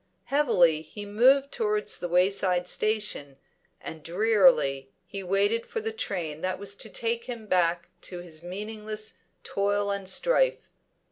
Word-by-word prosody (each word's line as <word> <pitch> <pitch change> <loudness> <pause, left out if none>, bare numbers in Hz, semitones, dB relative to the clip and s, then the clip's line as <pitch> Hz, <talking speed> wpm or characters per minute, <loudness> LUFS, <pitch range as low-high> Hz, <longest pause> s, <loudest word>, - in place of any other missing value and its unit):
Heavily 180 - +3
he 205 +7 -9
moved 260 +7 +4
towards 425 -2 -1
the 175 - -4
wayside 180 0 +2
station, 210 -11 -1 0.4
and 160 - -8
drearily 175 - +3 0.2
he 200 -1 -6
waited 200 +5 +1
for 455 - -3
the 445 0 -4
train 170 - -4
that 185 0 -1
was 200 0 -4
to - - -9
take 235 0 -2
him 235 -3 -7
back 175 -3 +1 0.2
to 180 - -7
his 170 -3 -10
meaningless 215 +4 -5 0.2
toil 200 0 0
and 200 -1 -3
strife. - - +2
200 Hz, 140 wpm, -27 LUFS, 175-230 Hz, 0.4 s, moved